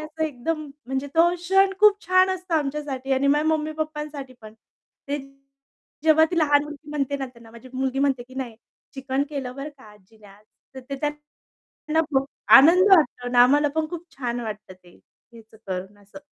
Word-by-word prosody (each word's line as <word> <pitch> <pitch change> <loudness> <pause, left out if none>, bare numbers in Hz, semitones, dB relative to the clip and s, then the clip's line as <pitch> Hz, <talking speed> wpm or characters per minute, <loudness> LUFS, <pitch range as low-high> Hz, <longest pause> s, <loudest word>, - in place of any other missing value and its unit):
असं 310 +1 -6
एकदम, 310 +2 -3 0.2
म्हणजे 265 +2 -3
तो 335 +1 +5
क्षण 385 +3 +2
खूप 415 -1 +5
छान 370 +1 +4
असतं 370 -2 -3
आमच्यासाठी 275 -3 -2
आणि 265 +1 +1
माझ्या 295 +2 +2
मम्मी-पप्पांसाठी 305 -3 -3
पण. 215 0 -13 0.5
ते 290 +1 -1 0.9
जेव्हा 315 0 +6
ती 345 - 0
लहान 290 -2 +4
मुलगी 295 0 -11
म्हणते 280 -1 -2
ना 270 -1 -4
त्यांना 235 -2 -16
माझी 235 +3 -14
मुलगी 265 0 -2
म्हणते, 275 -3 +1
की 255 +2 -17
"नाही, 245 -4 -6 0.4
चिकन 270 0 -2
केलं 270 -4 -5
बरं 280 +2 -5
का" 260 - -17
"आजीने 210 +1 -21
आज." 200 +1 -18 0.3
तर 260 - -8
ते 275 - -3
त्यांना 295 0 -5 0.8
खूप 270 -1 0 0.3
आनंद 360 +8 +6
वाटतो 250 -5 0
अन् 245 - -3
आम्हाला 290 +4 +4
पण 315 -1 0
खूप 345 -1 -7
छान 245 -2 -3
वाटतं 210 -4 -7
ते 180 -1 -21 0.3
हेच 230 -1 -14 0.2
करून 190 +2 -6
असं. 205 +8 -14
280 Hz, 175 wpm, -23 LUFS, 250-310 Hz, 0.9 s, जेव्हा